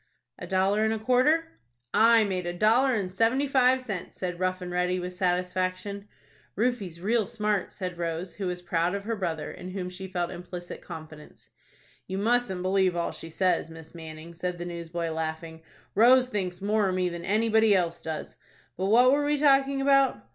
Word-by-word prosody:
"A - - -7
dollar 195 +3 +2
and 220 - +2
a - - -3
quarter?" 275 +9 +2 0.3
"I 225 +1 +6
made 185 -3 -2
a 175 - -2
dollar 240 +6 +4
and 195 -4 -2
seventy 230 +8 +2
five 260 -1 +3
cents," 200 -8 -6
said 180 -2 -4
Rough 185 0 0
and 180 -1 -6
Ready, 180 +1 0
with 180 0 -5
satisfaction. 185 +2 -2 0.5
"Rufie's 210 -7 -1
real 220 +3 +1
smart," 210 -4 -1
said 180 -2 -6
Rose, 170 +2 -3
who 195 -2 -3
was 180 0 -4
proud 175 +2 0
of 200 - -4
her 230 +2 -2
brother, 165 -7 -3
in 180 - -9
whom 185 -1 -5
she 190 +1 -7
felt 175 -2 -2
implicit 175 0 -8
confidence. 155 -1 -11 0.6
"You 190 - -4
mustn't 210 -3 +1
believe 185 -1 +2
all 170 0 -1
she 165 - -9
says, 180 -1 0
Miss 160 -1 -12
Manning," 160 0 -9
said 180 +1 -4
the 175 - -5
newsboy, 170 -1 -4
laughing. 160 0 -4 0.3
"Rose 250 +3 +5
thinks 185 -5 -3
more 210 -1 +2
of 185 - -1
me 185 -1 +1
than 170 -1 -5
anybody 220 +1 +3
else 170 -2 0
does. 160 -1 -6 0.4
But 185 - -1
what 245 +5 +6
were 290 +1 +2
we 295 0 +1
talking 275 -1 +3
about? 275 -1 +3
185 Hz, 185 wpm, -27 LUFS, 175-225 Hz, 0.6 s, I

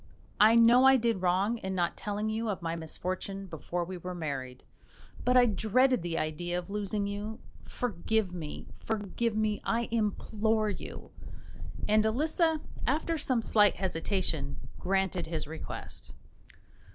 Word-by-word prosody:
I 220 +2 +7
know 235 +2 +7
I 265 0 +8
did 230 -5 0
wrong 190 +6 +2
in 190 -2 -3
not 175 -2 0
telling 210 +1 -3
you 220 +1 -1
of 190 -4 -3
my 165 0 -1
misfortune 185 +4 -4
before 175 0 -4
we 185 +1 -6
were 180 +1 -5
married, 135 -6 -5 0.6
but 250 +1 +4
I 250 - +7
dreaded 245 +3 +3
the 170 -1 -2
idea 175 +3 -2
of 180 +2 -5
losing 205 0 -1
you. 205 +2 -4 0.3
Forgive 220 -3 -1
me, 160 -4 -6
forgive 220 +1 -2
me, 215 -1 0
I 235 +1 0
implore 215 0 +1
you!" - - -8 0.8
and 215 0 +4
Elisa, 310 - +1 0.3
after 310 +5 +1
some 250 -5 +1
slight 210 -2 +4
hesitation, 165 -5 -1 0.2
granted 190 -2 0
his 160 -2 -2
request. 160 +2 -7
205 Hz, 140 wpm, -30 LUFS, 175-225 Hz, 0.8 s, I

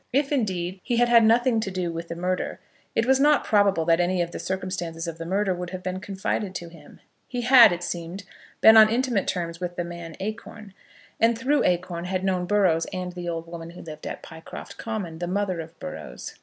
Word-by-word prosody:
If, 275 +2 +1
indeed, 190 -8 -1
he 240 -2 -1
had 240 0 +3
had 235 -1 +7
nothing 235 +1 +4
to 215 - -2
do 185 -2 -2
with 165 0 -6
the 170 - -5
murder, 180 +1 -2 0.4
it 225 - +2
was 265 +1 +4
not 295 0 +4
probable 200 -6 +3
that 165 0 +3
any 180 +1 +1
of 170 - -6
the - - -6
circumstances 180 -3 -4
of 165 -1 -6
the 165 - -5
murder 195 +1 +1
would 180 0 -5
have 185 0 -7
been 185 0 -3
confided 195 0 -3
to 170 -2 -5
him. 165 -3 -16 0.3
He 245 -1 -3
had, 250 -2 +8
it 175 0 -3
seemed, 175 +3 -5 0.4
been 220 0 +9
on 215 -1 +9
intimate 235 -3 0
terms 170 -2 -3
with 175 -1 -4
the 175 - -2
man 170 -2 -8
Acorn, 215 0 -7 0.5
and, 230 0 +3
through 275 +6 +2
Acorn, 175 -1 -1
had 185 0 -2
known 185 -2 0
Burrows 185 -5 +3
and 180 -1 -4
the 175 -1 -5
old 165 -1 -4
woman 165 -1 -8
who 170 - -11
lived 155 -2 -8
at - - -6
Pycroft 160 0 -10
Common, 195 -8 -4
the 175 - -3
mother 190 -1 -1
of 165 +1 -8
Burrows. - - -7
185 Hz, 220 wpm, -25 LUFS, 170-215 Hz, 0.5 s, been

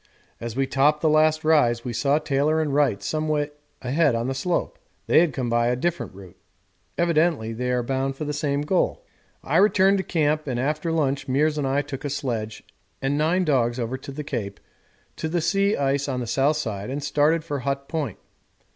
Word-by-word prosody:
As 115 -1 -6
we 135 +1 +1
topped 145 +3 +2
the 160 - +3
last 155 +1 +3
rise 130 -7 +3
we 120 - -3
saw 140 +5 +2
Taylor 155 +1 +1
and 150 -3 -1
Wright 135 -9 +2
some 155 +7 -2
way 150 -1 0 0.3
ahead 140 +1 +2
on 115 +1 -1
the 135 - -1
slope; 170 +7 -2 0.3
they - - +5
had 170 -2 +3
come 130 -2 -3
up - - -3
by 120 0 +2
a 125 - +2
different 170 - -2
route. 95 -3 -13 0.6
Evidently 165 -9 +1
they 125 +2 -3
are 125 -1 +1
bound 135 +2 -1
for 155 - -5
the 150 - -3
same 145 -1 -1
goal. 180 +5 0 0.4
I 155 - +1
returned 195 0 +4
to - - -1
camp, 155 -3 0
and 125 -2 -2
after 150 +5 -1
lunch 140 -4 0
Meares 150 +3 +1
and 140 - 0
I 140 +2 +1
took 140 -2 -7
a 145 - -2
sledge 115 -6 -3 0.4
and 135 +1 0
nine 165 +5 +1
dogs 120 -5 +1
over 120 +2 -2
the 140 +3 -7
Cape 110 -8 -4 0.6
to 160 - -3
the 175 +2 0
sea 200 +5 +1
ice 140 0 0
on 130 -2 -2
the 125 - -3
south 140 +6 +1
side 105 -6 -4
and 140 +2 -4
started 150 +3 +2
for 145 -3 -3
Hut 140 +1 -3
Point. 150 - -3
145 Hz, 210 wpm, -24 LUFS, 125-155 Hz, 0.6 s, they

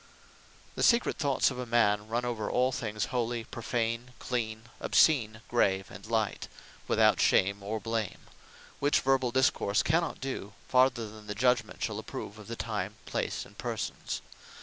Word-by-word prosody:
The - - -5
secret 235 0 +4
thoughts 140 -2 +2
of 125 - -6
a 125 - -3
man 105 -3 +3
run 120 +2 -1
over 115 -4 -2
all 125 +1 +2
things, 110 -5 -2
holy, 120 -1 -1
prophane, 115 +1 -3
clean, 110 -3 -3 0.2
obscene, 115 -8 +3
grave, 95 -5 +1
and 90 - -10
light, 110 -2 -1 0.4
without - - +4
shame, 100 +1 +3
or 110 +3 -3
blame; 115 -2 -3 0.6
which 145 +1 +3
verball 130 -2 +2
discourse 120 -5 +2
cannot 165 +2 +1
do, 130 -6 -5
farther 125 -3 +3
than 105 0 -12
the 105 - -4
Judgement 120 -1 +1
shall - - -2
approve 105 - -7
of 105 - -11
the 115 - -4
Time, 105 -3 -3
Place, - - -2
and - - -17
Persons. - - -4
115 Hz, 155 wpm, -30 LUFS, 105-125 Hz, 0.6 s, secret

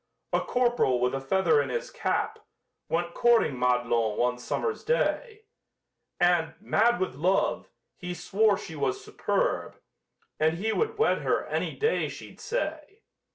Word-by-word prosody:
A - - +4
corp'ral 240 - +1
with 125 +1 +1
a 135 - -2
feather 190 - +3
in - - -4
his - - -3
cap - - -1 0.5
Went 170 +1 -1
courting 235 - +3
Madelon 120 -3 +1
one 125 0 +1
summer's 440 - -3
day, 470 -2 -1 0.8
And, 175 -2 +2
mad 235 +3 +2
with 185 - -1
love, 180 +8 0 0.3
he 180 -1 -5
swore 200 +4 +2
she 170 -5 -8
was 135 -3 -2
superb, - - -1 0.6
And 160 +1 +2
he 220 +4 -1
would 450 0 -1
wed 445 - +2
her - - 0
any - - -2
day 450 +2 0
she'd - - -11
say. 400 -3 -4
190 Hz, 145 wpm, -27 LUFS, -, 0.8 s, A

